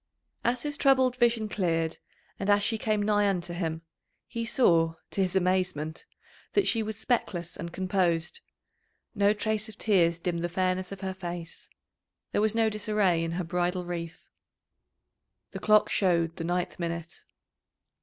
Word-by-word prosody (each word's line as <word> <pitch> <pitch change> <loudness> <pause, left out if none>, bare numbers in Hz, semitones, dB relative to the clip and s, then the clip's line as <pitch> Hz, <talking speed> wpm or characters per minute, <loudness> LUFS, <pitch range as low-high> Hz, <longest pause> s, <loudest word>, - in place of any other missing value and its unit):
As 240 +1 0
his 295 -1 -3
troubled 260 -2 +4
vision 235 -3 +2
cleared 165 -5 -1 0.4
and 195 - -2
as 205 0 +4
she 225 0 0
came 215 -1 0
nigh 205 -1 +3
unto 175 -2 -2
him, 165 -2 -3 0.4
he 230 -1 -4
saw 165 -9 +3 0.2
to 195 - 0
his 185 -1 0
amazement 180 -4 0 0.5
that 405 - +3
she 225 - +2
was 215 -1 -4
speckless 185 -7 -1
and 170 - -6
composed 175 -2 0 0.7
no 205 -2 +3
trace 215 0 -1
of 215 - -13
tears 170 -6 +3
dimmed 170 0 -2
the 175 - -1
fairness 185 +1 -1
of 195 0 -7
her 190 -1 -3
face, 175 -2 -7 0.6
there - - +1
was 215 0 +2
no 225 -1 +3
disarray 210 -5 +1
in 165 0 -2
her 180 +1 -2
bridal 180 +1 -1
wreath. 170 -1 -6 1.2
The - - -6
clock 215 0 +5
showed 170 -4 +1
the 165 - -4
ninth 175 +1 -2
minute. 170 0 -5
185 Hz, 155 wpm, -28 LUFS, 170-215 Hz, 1.2 s, clock